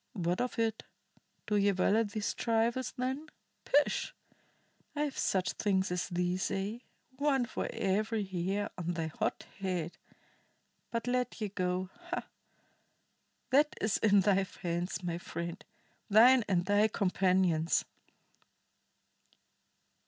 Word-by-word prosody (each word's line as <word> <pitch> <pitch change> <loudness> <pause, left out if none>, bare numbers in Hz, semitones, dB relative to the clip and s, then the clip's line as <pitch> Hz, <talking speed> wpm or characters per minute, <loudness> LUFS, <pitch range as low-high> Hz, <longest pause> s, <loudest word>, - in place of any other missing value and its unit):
What 175 -1 -1
of 250 0 -2
it? 225 -1 0 0.6
Do 210 - +1
ye 200 0 +4
value 200 +3 +3
these 210 0 -3
trifles, 230 +2 0
then? 260 +5 -2 0.4
Pish! 290 +1 +2 0.8
I 295 - -1
have 290 -2 -1
such 185 -1 +1
things 190 -3 0
as 180 +1 -2
these, 180 +1 0
aye, 200 +4 -3 0.4
one 275 -3 +2
for 240 - -3
every 215 +1 0
hair 190 +2 -2
on 175 0 -2
thy 165 -1 -2
hot - - -1
head. 180 -4 -3 0.9
But 230 -1 -2
let 250 0 -1
ye 210 -2 -2
go 185 -1 -2 0.2
ha! 360 - -2 1.3
That 295 +3 +4
is 215 -1 +1
in 205 -2 +5
thy 195 0 +3 0.2
hands, 175 +2 -2
my 170 -1 -2
friend, 170 0 -5 0.5
thine 235 +3 +7
and 175 -2 +2
thy 205 +2 +4
companions." 185 -5 +2
200 Hz, 125 wpm, -32 LUFS, 180-230 Hz, 1.3 s, thine